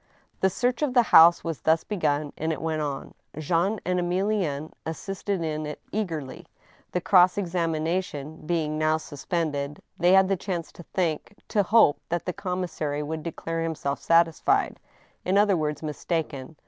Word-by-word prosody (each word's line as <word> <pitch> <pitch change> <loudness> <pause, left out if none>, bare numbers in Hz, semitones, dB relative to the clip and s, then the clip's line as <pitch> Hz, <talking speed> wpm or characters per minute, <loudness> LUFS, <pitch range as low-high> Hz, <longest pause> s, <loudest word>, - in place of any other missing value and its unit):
The 190 - +3
search 245 - -1
of 280 -4 0
the 245 - +6
house 165 +1 +8
was 165 -3 -4
thus 160 +1 +3
begun, 150 -7 -1
and 160 +1 -2
it 160 - -3
went 160 -1 -2
on. 145 -2 -4 0.2
Jean 175 +7 0
and 180 0 +1
Emilienne 175 -4 -1
assisted 195 +2 -3
in 155 -1 -3
it 150 - -6
eagerly. 160 -11 -4 0.4
The 180 - -1
cross 180 -1 +5
examina 170 -2 0
tion 150 -1 -9
being 155 -3 -1
now 155 0 +2
suspended, 150 -1 -3 0.2
they 175 +2 +5
had 190 0 +6
the 195 - +2
chance 175 -2 -4
to - - -12
think, 175 +2 -2
to 205 - +2
hoj)e 210 -6 +5
that 175 0 -2
the 180 - -2
commissary 175 -6 -3
would 160 +1 -4
declare 165 0 -4
himself 155 -4 -2
satisfied 165 -1 +2 0.2
— - - -36
in 185 +2 +1
other 205 -1 +4
words, 150 -2 -2
mistaken. 150 -2 -3
165 Hz, 165 wpm, -26 LUFS, 155-185 Hz, 0.4 s, house